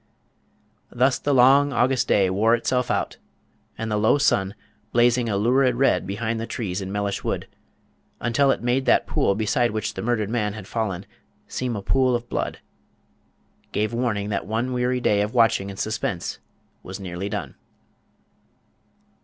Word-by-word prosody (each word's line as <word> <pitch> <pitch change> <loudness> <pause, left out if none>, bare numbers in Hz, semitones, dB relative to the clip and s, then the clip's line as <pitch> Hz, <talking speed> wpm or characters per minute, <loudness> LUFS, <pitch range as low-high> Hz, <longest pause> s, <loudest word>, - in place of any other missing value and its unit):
Thus 125 +2 +2
the 145 - -1
long 135 +2 +5
August 130 0 +1
day 95 -2 +3
wore 110 +5 +3
itself 125 +1 -1
out, - - -1 0.6
and 110 0 -4
the 105 - +1
low 110 +6 +3
sun 100 -9 +1 0.4
blazing 120 0 +3
a 100 - 0
lurid 125 +4 +3
red 135 -5 +2
behind 110 +3 -2
the 115 - -4
trees 105 -5 -3
in 95 0 -5
Mellish 100 -1 -2
Wood, - - -3 0.7
until 120 +4 +2
it 135 - 0
made 125 +2 0
that - - +4
pool 100 - +1
beside 120 +4 +1
which 110 -1 -3
the - - -5
murdered 110 -3 -1
man 105 -4 -1
had 105 -2 -8
fallen 105 -4 -3 0.4
seem 125 -2 -3
a 100 - -5
pool 130 +1 +2
of 120 0 -5
blood - - -2 1.2
gave 105 +2 0
warning 115 -4 -1
that 100 - -2
one 115 +4 -1
weary 125 0 0
day 105 -3 +2
of 105 +4 -3
watching 115 -4 +3
and 95 - -8
suspense 105 -5 -3 0.4
was 95 +2 -8
nearly 95 +1 -5
done. 100 -10 -4
115 Hz, 160 wpm, -23 LUFS, 100-125 Hz, 1.2 s, long